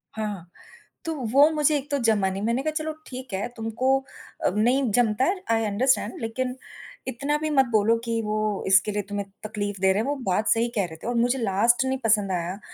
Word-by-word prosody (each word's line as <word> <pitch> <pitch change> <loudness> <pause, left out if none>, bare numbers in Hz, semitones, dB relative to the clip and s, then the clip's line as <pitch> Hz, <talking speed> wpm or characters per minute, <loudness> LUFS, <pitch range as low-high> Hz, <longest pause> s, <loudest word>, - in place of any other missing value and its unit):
हाँ, 215 -1 -2
हाँ। 180 -5 -7 0.6
तो 325 - -1 0.2
वो 285 +4 +6
मुझे 300 -1 +2
एक 285 +1 -7
तो 285 - +2
जमा 210 -4 +3
नहीं, 190 +1 -4
मैंने 235 +4 0
कहा 310 - 0
चलो 310 0 -2 0.2
ठीक 255 -3 -8
है, 190 +1 -1
तुमको 230 +4 +1 0.5
अ, - - +5
नहीं 245 +3 +2
जमता 225 +2 +2
है, 370 +1 -1
आई 225 0 +2
अंडरस्टैंड 220 +2 +1
लेकिन 250 +3 -2 0.5
इतना 280 +4 -1
भी 310 - -1
मत 270 -3 +4
बोलो 220 +1 +4
कि 230 -1 -1
वो 215 -1 -1
इसके 195 +2 +4
लिए 205 0 -1
तुम्हें 205 -1 -3 0.2
तकलीफ 205 -2 -4
दे 190 0 +4
रहे 205 - +1
हैं 225 - -3
वो 290 - 0
बात 210 +3 0
सही 230 +1 +3
कह 200 -3 +1
रहे 160 -2 -9
थे - - -5
और 240 - -1
मुझे 245 +3 +2
लास्ट 230 +4 +2
नहीं 265 0 0
पसंद 210 -3 +2
आया, 180 +2 -3
225 Hz, 220 wpm, -25 LUFS, 205-260 Hz, 0.6 s, वो